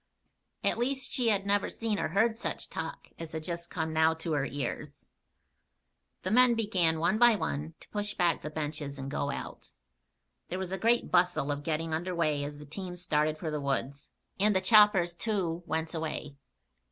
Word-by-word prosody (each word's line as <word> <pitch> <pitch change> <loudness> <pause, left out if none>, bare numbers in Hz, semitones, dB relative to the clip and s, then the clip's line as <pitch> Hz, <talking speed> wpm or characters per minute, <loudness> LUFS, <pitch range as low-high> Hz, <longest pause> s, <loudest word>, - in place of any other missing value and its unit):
At - - +1
least, 265 +2 0
she 245 -3 +1
had 200 -2 +2
never 200 0 +2
seen 220 -3 -2
or - - 0
heard 220 +7 +2
such 230 - -4
talk - - -6
as 165 -1 -7
had 160 -1 -4
just 170 0 -4
now - - -15 0.3
come 160 0 +1
to 165 0 -4
her 145 -3 +1
ears. 140 -4 -5 1.2
The 185 - -2
men 245 +1 +6
began, 185 -8 +2
one 210 +6 +2
by 240 -2 +7
one, 155 -4 -3
to - - -16
push 205 0 -3
back 175 -3 +2
the 150 - -5
benches 150 -2 -4
and 135 0 -6
go 140 - -1
out. - - -7 0.8
There 185 - -3
was 190 -1 -4
a 190 - -1
great 235 +1 +2
bustle 175 -5 +3
of 145 0 -3
getting 160 +1 -2
under 175 +3 -2
way 155 -4 +1
as 145 0 -5
the 150 - -10
teams 180 +4 -6
started 155 -2 +1
for 160 -1 -4
the 150 -1 -2
woods, 140 0 -2 0.3
and 210 +1 +4
the - - +5
choppers, 190 -3 +5
too, 175 -4 -1
went 160 +1 -2
away. 155 -3 -4
170 Hz, 190 wpm, -30 LUFS, 155-205 Hz, 1.2 s, by